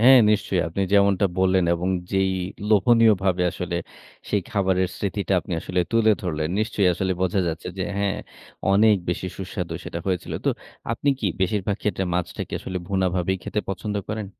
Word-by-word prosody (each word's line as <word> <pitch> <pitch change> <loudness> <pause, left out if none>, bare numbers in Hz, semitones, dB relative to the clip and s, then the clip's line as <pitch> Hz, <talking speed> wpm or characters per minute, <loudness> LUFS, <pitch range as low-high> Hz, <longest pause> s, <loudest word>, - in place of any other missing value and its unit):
হ্যাঁ, 130 +3 +8
নিশ্চয়ই। 100 -3 +1
আপনি 90 +4 -2
যেমনটা 100 -1 +4
বললেন, 95 -1 +3
এবং 85 +2 -2 0.2
যেই 95 0 +2 0.4
লোভনীয়ভাবে 105 -4 +4
আসলে 90 0 -4 0.5
সেই 105 -2 +1
খাবারের 95 -2 +1
স্মৃতিটা 100 +2 -2
আপনি 90 - -8
আসলে 90 +2 -1
তুলে 115 -1 +4
ধরলেন। 80 -4 -1
নিশ্চয়ই 105 -3 +2
আসলে 95 +1 0
বোঝা 95 +1 +1
যাচ্ছে 80 +1 -4
যে - - 0 0.2
হ্যাঁ, 100 -1 0 0.5
অনেক 105 +1 +5
বেশি 90 +1 -1
সুস্বাদু 90 -3 -4
সেটা 85 - -5
হয়েছিল। 90 -3 -2
তো - - +2 0.4
আপনি 130 +5 -2
কি 105 - 0
বেশিরভাগ 100 +1 0
ক্ষেত্রে 100 -2 0
মাছটাকে 90 -1 -3
আসলে 95 -1 -4
ভুনাভাবেই 95 -1 +1
খেতে 105 - -2
পছন্দ 105 +2 -3
করেন? 105 -1 -3
95 Hz, 160 wpm, -24 LUFS, 90-105 Hz, 0.5 s, হ্যাঁ